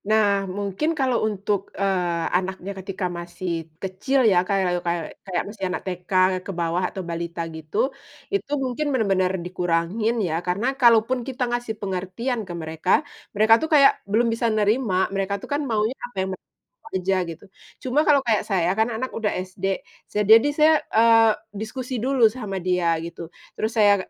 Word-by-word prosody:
Nah, 200 -3 +2
mungkin 200 - -1
kalau 260 -3 +2
untuk, 200 -1 -2
eee, 180 -4 0
anaknya 190 +1 -4
ketika 190 0 -4
masih 175 +1 -6 0.3
kecil 195 +9 0
ya 185 - +4
kayak 185 -3 +1
kayak 170 -1 -1 0.2
kayak 180 -3 -1
masih 205 -2 -9
anak 180 - -3
TK 180 -1 -6 0.3
ke - - -4
bawah 170 +2 0
atau 190 - -6
balita 170 0 -4
gitu, 160 +4 -7 0.6
itu 400 -7 -1
mungkin 260 +4 -2
bener-bener 195 -7 +2
dikurangin 180 +5 0
ya 160 - -2
karena 190 +6 0 0.2
kalaupun 235 +1 +5
kita 260 -1 -2
ngasih 240 -2 -2
pengertian 195 +6 -3
ke - - -4
mereka, 160 +2 -5 0.5
mereka 215 +2 +5
tuh 315 - -2
kayak 280 -2 +8 0.2
belum 230 +4 +3
bisa 230 +1 0
nerima, 210 0 +1 0.2
mereka 195 0 -1
tuh - - -7
kan 290 - 0
maunya 220 +1 +1 0.2
apa 245 - -27
yang - - -5
mereka 185 - -11 0.4
kejar 190 0 0
gitu. 165 - -12 0.4
Cuma 260 +3 +1
kalau 290 -2 +6
kayak 215 -3 +2
saya 180 -4 +2
kan 220 +2 +2
anak 245 +3 -4
udah 220 -2 0 0.2
SD, 195 +1 -2 0.3
sa 210 - -1
jadi 225 +2 +8
saya, 305 +2 +5 0.2
eee, 225 0 +6 0.2
diskusi 245 +5 -5
dulu 260 -3 +4
sama 215 -4 -4
dia 175 -2 +1
gitu. 170 +1 -7 0.3
Terus 220 - -1
saya 205 -1 +6
agak - - -17
200 Hz, 170 wpm, -23 LUFS, 180-230 Hz, 0.6 s, kayak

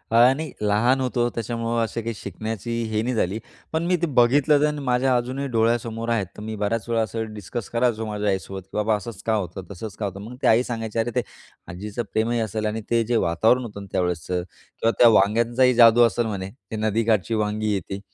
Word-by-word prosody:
आणि 130 +7 +4
लहान 115 +6 +2
होतो 120 -2 0
त्याच्यामुळं 115 0 -1
असं 115 +1 -3
काही 115 +1 -3
शिकण्याची 110 +3 -5 0.2
हे 110 0 +1
नाही 125 +2 -1
झाली. 100 0 0 0.3
पण 160 +1 0
मी 180 - +2
ते 170 - +2
बघितलं 145 +2 +4
तर 150 0 +1
माझ्या 130 -1 +2
अजूनही 130 +3 -3
डोळ्यासमोर 115 0 0
आहेत. 115 -4 +1
तर - - -8
मी 110 +1 -5
बऱ्याच 105 +2 -2
वेळा 115 -1 +2
असं 110 0 -3
डिस्कस 105 +1 -6
करायचो 115 -2 0
माझ्या 105 -1 -2
आईसोबत, 95 0 -3
की 95 - -25
"बाबा, 105 +1 +2
असंच 105 -1 -7
का 110 - +1
होतं, 95 -2 -3
तसंच 100 +2 -7
का 105 - -1
होतं." 100 0 -5
मग 115 +4 -8
ती - - +2
आई 115 +3 +5
सांगायची, 115 -2 -3
"अरे 120 +1 0
ते - - +3 0.5
आजीचं 105 +6 -5
प्रेमही 115 +2 +1
असेल 110 -1 -2
आणि 110 +1 -2
ते 115 -1 +3
जे 120 +2 0
वातावरण 110 +9 +3
होतं 105 -3 -7
ना, 100 - -10
त्यावेळेसचं 90 0 -1 0.4
किंवा 115 - +3
त्या 120 - +8
वांग्यांचाही 115 +5 +3
जादू 115 0 +7
असेल 120 0 +2
म्हणे. 95 -3 -4 0.2
ते - - -3
नदीकाठची 110 0 +1
वांगी 105 0 0
आहे 100 - +1
ती" 100 0 -4
115 Hz, 210 wpm, -23 LUFS, 105-120 Hz, 0.5 s, त्या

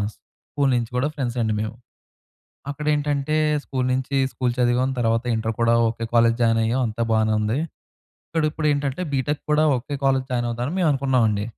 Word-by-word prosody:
School 140 -2 -4
నుంచి 120 -2 -1
కూడా 130 +4 +1
friends 125 -3 -3
అండి 110 -1 0
మేము. 110 +1 -4 1.0
అక్కడ 150 +1 -6
ఏంటంటే 145 0 0 0.3
స్కూల్ 130 -2 -2
నుంచి 130 +2 -1 0.2
స్కూల్ 125 -2 -1
చదివాం 125 +1 +2
తర్వాత 115 0 +1
ఇంటర్ 110 0 -2
కూడా 115 0 +4
ఒకే 115 0 -4
కాలేజ్ 115 0 +4
జాయిన్ 115 -1 +3
అయ్యాం 120 +4 0
అంతా 115 +1 -3
బానే 110 0 +2
ఉంది. 105 +5 0 0.7
ఇక్కడ 160 -1 -1
ఇప్పుడు 155 0 -3
ఏంటంటే 145 +3 -2
బీటెక్ 140 +2 -1
కూడా 150 +1 +4
ఒకే 135 +4 -5
కాలేజ్ 135 -1 +2
జాయిన్ 120 -1 0
అవుదామని 120 +8 -3
మేము 165 - +3
అనుకున్నామండి. 125 -7 +1
125 Hz, 170 wpm, -23 LUFS, 115-140 Hz, 1.0 s, కూడా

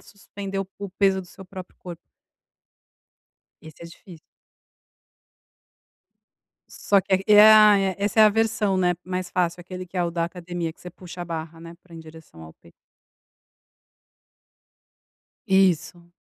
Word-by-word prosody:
suspender 200 -1 -9
o 190 - -6
o 200 -1 -6
peso 195 0 +1
do 180 - -13
seu 190 - -14
próprio 185 0 -11
corpo. 175 -2 -9 1.6
Esse 160 +1 -14
é 170 - -9
difícil. 170 -1 -15 2.5
Só 200 -1 +1
que 190 - -3
ai 190 +1 +1 0.2
ah 215 -1 +7
é, 195 -2 -1
essa 205 +2 -1
é 220 - +8
a 215 - +6
versão, 215 -2 0
né, 180 -1 +1
mais 185 -1 -5
fácil, 175 -1 -1
aquele 185 +1 -9
que 185 +1 -9
é 175 - +1
o 170 - -3
da 170 0 -1
academia, 175 -1 -6
que - - -26
você 180 - -10
puxa 180 0 -11
a - - -6
barra, 165 -1 -7
né, 165 0 -12
pra 175 -2 -19
em 165 - -10
direção 160 - -15
ao 80 - -14
peito. 85 - -22 2.8
Isso. 180 -2 +1
180 Hz, 150 wpm, -23 LUFS, 170-195 Hz, 2.8 s, é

